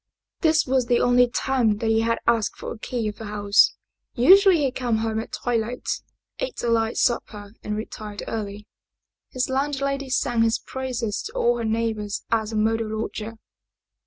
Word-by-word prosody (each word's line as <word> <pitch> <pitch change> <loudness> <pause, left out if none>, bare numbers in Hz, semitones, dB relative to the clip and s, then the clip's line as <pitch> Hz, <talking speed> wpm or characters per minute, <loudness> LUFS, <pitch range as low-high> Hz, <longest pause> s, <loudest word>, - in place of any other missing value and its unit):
This 320 -1 +3
was 255 -2 +1
the 240 -1 +3
only 245 0 +4
time 240 -4 +1
that 225 +1 0
he 225 0 +3
had 230 0 +1
asked 230 -3 +1
for - - -6
the 230 - -13
key 235 -1 -3
of 210 - -5
the 225 - -8
house. 205 -1 +3 0.4
Usually 365 - +6
he 270 - +1
came 245 -3 -1
home 220 0 -1
at 225 - -6
twilight, 240 0 -2 0.5
ate - - -4
a 240 - +1
light 225 -1 +1
supper 210 -3 -1
and 210 - -3
retired 215 -1 -6
early. 210 -1 -5 0.6
His 255 0 -1
landlady 275 0 -1
sang 245 -2 +1
his 230 0 +3
praises 250 -5 -4
to - - -12
all 240 0 +2
her 230 - -2
neighbors 220 -2 -2
as 220 -1 +1
a - - -4
model 220 0 0
lodger. 220 0 -5
230 Hz, 175 wpm, -24 LUFS, 220-255 Hz, 0.6 s, Usually